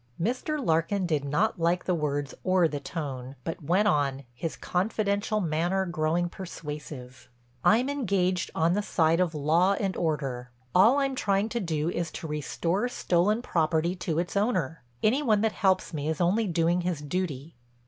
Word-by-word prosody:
Mr. 250 - -1
Larkin 165 +4 +1
did 155 -5 0
not 150 +9 0
like 170 +2 +1
the 185 - +1
words 145 -3 -2
or 185 -2 +4
the 145 -2 -4
tone, 135 -4 -5
but 165 - -5
went 180 +8 +2
on, 140 -6 +1
his 155 +7 -4
confidential 205 +2 0
manner 175 +2 0
growing 170 0 0
persuasive: 150 -7 -8 0.3
"I'm 235 +5 +4
engaged 195 -10 0
on 165 +2 +2
the 205 - +1
side 165 -4 +2
of 175 -3 +1
law 165 +6 +3
and 195 -1 -1
order. 135 -6 -2 0.2
All 220 +9 +6
I'm 275 -1 +1
trying 200 -3 +1
to 235 - -2
do 165 -4 -1
is 170 -2 -2
to - - -6
restore 165 - -1
stolen 210 +2 +1
property 165 -2 +1
to 170 -3 -2
its 175 +3 -2
owner. 185 - 0 0.2
Any 250 +7 +3
one 215 -7 +2
that 220 0 +2
helps 190 -3 +1
me 150 0 -2
is 160 - -2
only 205 +6 +2
doing 170 0 +1
his 175 -3 -2
duty." 150 -2 -3
175 Hz, 170 wpm, -27 LUFS, 155-200 Hz, 0.3 s, All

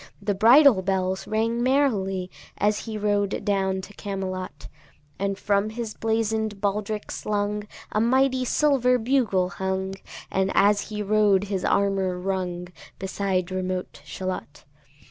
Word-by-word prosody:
The 205 - -1
bridle 235 +2 +6
bells 190 0 -1
rang 230 +2 0
merrily 205 -9 +1 0.3
As 210 0 +1
he 220 -2 -4
rode 205 -1 0
down 190 -2 0
to 195 +2 -11
Camelot: 190 -2 -5 0.5
And 195 0 -1
from 200 +1 +1
his 220 -1 -5
blazon'd 220 -2 -1
baldric 210 +1 -2
slung 210 0 -2 0.2
A 215 - +1
mighty 260 +2 +3
silver 250 -2 +3
bugle 225 -7 +1
hung, 190 +1 -3 0.4
And 190 0 +1
as 205 +1 +3
he 210 -1 -3
rode 205 -2 +3
his 195 -3 -3
armour 195 -2 +1
rung, 180 -1 -3 0.3
Beside 190 -1 -2
remote 185 0 -3
Shalott. 185 -6 -6
200 Hz, 125 wpm, -25 LUFS, 190-220 Hz, 0.5 s, bridle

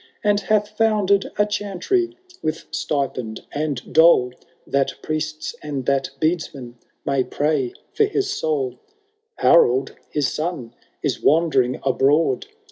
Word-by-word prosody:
And 205 -1 +3
hath 210 0 0
founded 210 -3 +2
a 205 - +4
chantry 210 - -1 0.2
with 155 +1 -3
stipend 125 -6 -2
and 145 -4 -3
dole. 160 -7 +6 0.3
That 135 -1 0
priests 155 0 -3
and 140 -4 -4
that 140 +1 +1
beadsmen 150 -7 -2 0.3
may 140 -2 +2
pray 145 -4 -1 0.2
for 430 - +3
his 400 -1 -1
soul: 425 -2 -1 0.6
Harold 135 -5 +4
his 145 -2 0
son 155 -8 -4 0.3
is - - -1
wandering 140 -6 +3
abroad. 135 +1 +2
155 Hz, 120 wpm, -22 LUFS, 135-205 Hz, 0.6 s, dole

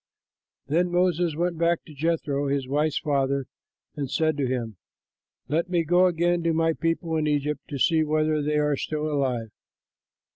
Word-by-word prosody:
Then 170 +5 +1
Moses 175 -2 +1
went 170 0 -1
back 170 0 +1
to 155 - -12
Jethro, 145 -2 -1
his 140 -2 -1
wife's 150 +2 0
father, 140 -3 0 0.5
and 140 -3 -3
said 155 +1 +1
to 140 -2 0
him, 120 -5 -3 0.7
"Let 165 +5 0
me 175 -2 +1
go 175 +3 +4
again 175 0 +1
to 165 0 +1
my 165 0 +2
people 165 0 -1
in 155 -1 0
Egypt 145 -1 0
to 145 - -5
see 160 +3 +3
whether 155 0 +1
they 150 +1 0
are 150 -1 +2
still 150 +2 -3
alive." 125 -6 -1
155 Hz, 170 wpm, -25 LUFS, 140-170 Hz, 0.7 s, go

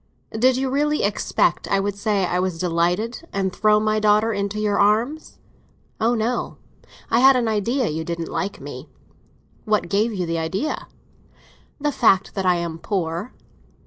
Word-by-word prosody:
"Did 255 +3 +2
you 265 +1 0
really 295 +2 +1
expect 200 +1 0
I 195 - +2
would 200 0 -2
say 200 -1 0
I 180 0 -1
was 185 -2 -1
delighted, 180 - -1
and 190 -2 -1
throw 210 0 +3
my 215 0 +1
daughter 215 +1 +3
into 200 +1 -2
your 210 -1 0
arms?" 225 +10 +1 0.6
"Oh 235 +2 +2
no; 230 +2 -2 0.5
I - - +4
had 265 +1 +7
an 245 -2 +1
idea 225 +4 0
you 160 +1 -3
didn't 170 0 -4
like 195 +1 -3
me." - - -9 0.7
"What 215 -1 0
gave 210 +3 +1
you 185 -4 -2
the 165 0 -2
idea?" 185 - -3 0.9
"The 295 +1 0
fact 200 -8 +3
that 190 -2 -2
I 180 - +4
am 170 -1 -4
poor." 175 +2 -3
210 Hz, 165 wpm, -22 LUFS, 185-230 Hz, 0.9 s, had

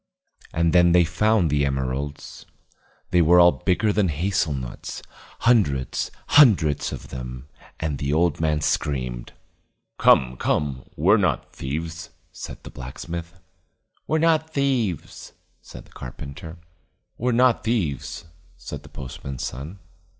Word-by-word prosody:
And 85 0 +1
then 85 -1 +5
they 90 0 +6
found 90 +1 +2
the 70 -1 +2
emeralds. 70 +1 -3 0.6
They 90 -1 +4
were 85 +2 +6
all 85 0 +8
bigger 95 +5 0
than 100 -2 +2
hazel 85 +1 0
nuts, 65 -4 -6 0.4
hundreds 75 - +2
and - - -20 0.2
hundreds 95 - +5
of - - -8
them: 65 +1 -7 0.3
and 75 -3 -2
the 70 0 -1
old 80 0 +2
man 75 -2 +1
screamed. 65 -5 -2 0.7
"Come, 65 -1 +4
come, 70 -2 -1
we're - - +4
not - - -1
thieves," 80 +4 -5 0.2
said - - -9
the - - -10
blacksmith. 85 +7 -7 0.7
"We're 155 - +1
not 160 0 +2
thieves," 125 - -1 0.3
said - - -12
the - - -22
carpenter. 70 +6 -9 0.6
"We're 125 +2 +1
not 125 0 +3
thieves," 95 - -2 0.3
said - - -8
the - - -15
postman's 65 0 -7
son. 75 +10 -7
80 Hz, 130 wpm, -23 LUFS, 70-95 Hz, 0.7 s, all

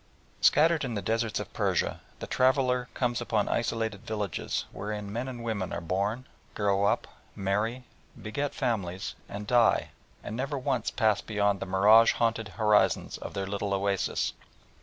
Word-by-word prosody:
Scattered 160 +2 +5
in 125 -4 -3
the 100 - -2
deserts 115 +2 0
of - - -7
Persia, - - 0 0.2
the - - -6
traveller 130 -1 +2
comes 120 -2 0
upon 110 -3 0
isolated 115 -3 -1
villages 105 -6 -3
wherein 105 -1 -5
men 120 +3 -2
and 120 -3 -6
women 105 -5 -2
are 85 - -2
born, 100 +8 -2 0.3
grow 100 -1 +2
up, - - +1 0.3
marry, 105 +6 -1 0.4
beget 140 +7 -3
families, 95 -7 -2 0.2
and 105 +1 -6
die, 120 +1 +3 0.3
and 105 - -5
never 135 +4 -2
once 125 -3 -1
pass 110 -2 +2
beyond 100 -2 0
the - - -5
mirage 105 +5 +6
haunted 115 -1 0
horizon 105 0 +2
of - - -7
their 100 -1 -2
little 100 0 -2
oasis. 100 0 0
110 Hz, 155 wpm, -28 LUFS, 100-120 Hz, 0.4 s, mirage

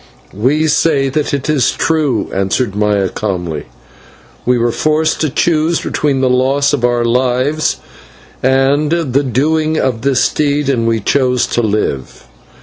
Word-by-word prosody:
"We 135 +10 +1
say 140 -3 +2
that 150 +2 -1
it 140 -1 -2
is 145 -5 +2
true," 150 -9 0
answered 100 +3 -1
Maya 105 -2 +1
calmly. 90 -6 -4 0.8
"We 125 0 +3
were 120 0 +1
forced 155 +4 0
to 155 - +1
choose 160 +3 +1
between 140 -3 -1
the 130 - +2
loss 135 +3 +1
of 135 -4 -1
our 120 -1 +1
lives 130 +5 0 0.6
and 135 +3 +2
the 145 -6 +1
doing 155 +5 0
of 125 -6 -1
this 135 0 +2
deed, 145 -1 0
and 115 -4 0
we 115 -1 0
chose 125 +2 +1
to 120 - +2
live. 105 - -2
130 Hz, 145 wpm, -14 LUFS, 120-150 Hz, 0.8 s, We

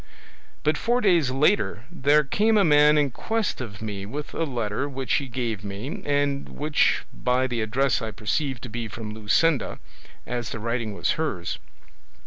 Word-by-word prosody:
But 155 0 +2
four 240 +2 +2
days 175 - +3
later 135 - +2
there 150 -2 +4
came 215 +10 +2
a 200 - +5
man 150 -1 +6
in 145 -2 +2
quest 220 - -2
of 105 -3 -7
me 100 -3 -4
with 145 +7 -6
a 165 - 0
letter 120 0 -2
which 135 -1 -2
he 140 - -6
gave 115 -5 -3
me, 100 +8 -5
and 145 -1 0
which 150 0 +1
by 125 +1 +1
the 125 -3 -2
address 125 +5 +1
I 110 - -3
perceived 120 +5 -2
to 125 - -6
be 115 +1 -4
from 110 0 -7
Luscinda, 110 +6 +1 0.5
as 120 -2 -3
the 115 - -5
writing 115 -1 -2
was - - +1
hers. 90 - -2
130 Hz, 170 wpm, -25 LUFS, 110-150 Hz, 0.5 s, man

